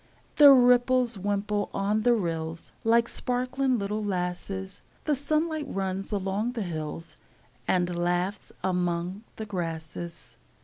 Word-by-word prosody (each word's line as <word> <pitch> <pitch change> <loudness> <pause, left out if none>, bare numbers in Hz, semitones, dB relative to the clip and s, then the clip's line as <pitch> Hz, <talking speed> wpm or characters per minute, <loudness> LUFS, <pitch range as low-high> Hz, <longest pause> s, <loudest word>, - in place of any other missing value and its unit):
The 295 -2 +10
ripples 250 -1 +5
wimple 205 +1 -1
on 205 +2 +1
the 240 +2 +4
rills, 165 -4 -3
Like 230 +1 +4
sparkling 255 +2 0
little 210 +1 -2
lasses; 190 0 -3 0.2
The 300 - +1
sunlight 305 +2 0
runs 195 -2 -3
along 205 +4 -1
the 230 -4 -2
hills, 165 -1 -6 0.5
And 180 -1 +1
laughs 175 +3 -1
among 180 +1 -1
the 220 - -5
grasses. 170 -3 -6
200 Hz, 120 wpm, -27 LUFS, 180-245 Hz, 0.5 s, The